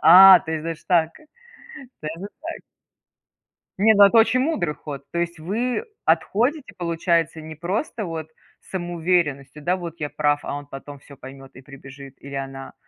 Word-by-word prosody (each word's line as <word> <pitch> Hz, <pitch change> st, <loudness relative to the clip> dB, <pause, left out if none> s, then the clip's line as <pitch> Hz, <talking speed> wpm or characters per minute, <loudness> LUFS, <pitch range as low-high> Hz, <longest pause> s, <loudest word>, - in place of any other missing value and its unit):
А, 190 Hz, +2 st, +10 dB
то 160 Hz, -, -8 dB
есть 160 Hz, -1 st, -3 dB
даже 165 Hz, -1 st, -4 dB
так, 165 Hz, -3 st, +3 dB, 0.9 s
даже 165 Hz, +5 st, -6 dB
так. 330 Hz, +1 st, -6 dB, 1.2 s
Нет, 215 Hz, +2 st, +5 dB
ну, 200 Hz, -, +9 dB
это 200 Hz, +3 st, +4 dB
очень 225 Hz, +3 st, +4 dB
мудрый 260 Hz, -, 0 dB
ход. 145 Hz, -3 st, -8 dB
То 170 Hz, -, -2 dB
есть, 170 Hz, 0 st, -2 dB
вы 235 Hz, -, -2 dB, 0.2 s
отходите, 255 Hz, +7 st, +1 dB
получается, 170 Hz, -2 st, 0 dB
не 155 Hz, 0 st, -9 dB
просто 200 Hz, -, -3 dB
вот 165 Hz, -2 st, -5 dB, 0.4 s
самоуверенностью, 170 Hz, -6 st, -1 dB
да, 180 Hz, +4 st, +1 dB
вот 170 Hz, -3 st, -7 dB
я 150 Hz, -, -3 dB
прав, 145 Hz, -1 st, +1 dB
а -, -, -4 dB
он 145 Hz, 0 st, -7 dB
потом 140 Hz, 0 st, -10 dB
всё 140 Hz, -1 st, -16 dB
поймет 135 Hz, +1 st, -12 dB
и 130 Hz, -, -12 dB
прибежит, 140 Hz, 0 st, -12 dB
или 140 Hz, 0 st, -9 dB
она, 135 Hz, 0 st, -6 dB
165 Hz, 165 wpm, -23 LUFS, 145-190 Hz, 1.2 s, А